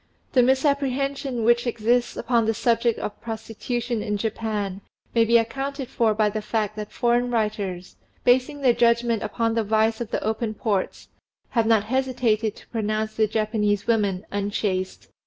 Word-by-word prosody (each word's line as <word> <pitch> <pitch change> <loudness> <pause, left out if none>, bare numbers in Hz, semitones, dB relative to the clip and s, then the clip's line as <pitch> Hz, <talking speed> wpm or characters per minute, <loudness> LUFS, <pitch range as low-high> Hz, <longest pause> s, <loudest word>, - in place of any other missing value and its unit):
The 255 - +6
misapprehension 275 -1 +1
which 240 +2 +3
exists 240 +1 +1
upon 230 -2 +1
the 225 - +1
subject 235 +1 +1
of 205 - -6
prostitution 230 +1 -3
in 210 -1 -2
Japan 210 -2 -3 0.3
may 230 - +4
be 235 +1 +5
accounted 270 +3 -2
for 225 -4 +1
by 215 0 +3
the 215 +1 -2
fact 215 -1 -2
that 210 -1 -6
foreign 240 +1 +1
writers, 210 -6 -2 0.3
basing 260 +4 +2
their 255 -3 +5
judgment 235 -2 +2
upon 225 +1 -1
the 225 -1 +1
vice 220 +2 +1
of 235 - -4
the - - -2
open 220 0 -2
ports, 205 -4 -2 0.4
have 230 -2 +1
not 225 -3 +4
hesitated 235 -3 0
to - - -16
pronounce 215 -1 -2
the 220 -1 +2
Japanese 210 -1 0
women 205 -4 +1
unchaste. 200 -2 -2
225 Hz, 155 wpm, -24 LUFS, 215-240 Hz, 0.4 s, The